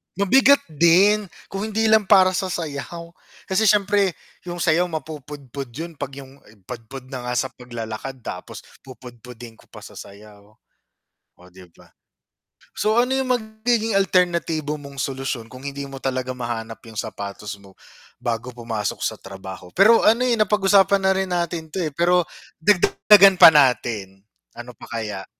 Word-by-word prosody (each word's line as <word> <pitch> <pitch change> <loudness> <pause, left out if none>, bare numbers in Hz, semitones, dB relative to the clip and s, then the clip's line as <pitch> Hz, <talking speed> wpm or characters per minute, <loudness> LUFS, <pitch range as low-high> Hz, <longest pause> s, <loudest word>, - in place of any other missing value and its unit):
Mabigat 265 +9 +4
din, 190 +7 +4 0.2
kung 195 +2 -4
hindi 220 +1 -1
lang 215 -3 +4
para 190 -2 +6
sa 190 +1 -2
sayaw 170 0 -6 0.3
kasi 195 +3 +1
syempre 200 -3 +2 0.3
yung 175 0 -5
sayaw 170 +2 +2
mapupudpud 145 -4 -7
yun 165 +1 -8
'pag 135 - -5
yung 135 +1 -17 0.2
pudpud 125 +3 -9
na 125 -2 -6
nga 125 - -2
sa 130 +2 -1
paglalakad 120 0 -7
tapos - - -8 0.2
pupudpudin 120 -2 -12
ko - - -21
pa - - -14
sa - - -12
sayaw, 105 +1 -15 0.8
o - - -21
'di 95 -1 -15
ba? - - -21 0.8
So 215 +1 0
ano 245 +2 +2
yung 265 -1 0
magiging 220 0 -2
alternatibo 170 -5 0
mong 140 -1 -12
solusyon 135 -4 -4
kung 130 +2 -9
hindi 140 0 -5
mo 135 -1 -9
talaga 130 -1 -3
mahanap 115 -3 -6
yung 110 - -12
sapatos 105 0 -6
mo 95 -1 -18 0.4
bago 120 +1 -4
pumasok 115 -3 -4
sa - - -3
trabaho 95 -1 -10
pero 215 +4 +6
ano 230 +3 +4
eh, 240 -3 +1
napag-usapan 200 -1 +3
na 190 - +3
rin 190 0 0
natin 170 -2 -2
'to 175 +4 -4
eh, 155 - -3
pero 175 +4 +2 0.4
dagdagdagan 200 0 +5
pa 180 - +10
natin, 115 -9 +1 0.3
ano 120 +1 -9
pa - - -12
kaya? 110 -2 -5
150 Hz, 155 wpm, -22 LUFS, 120-195 Hz, 0.8 s, pa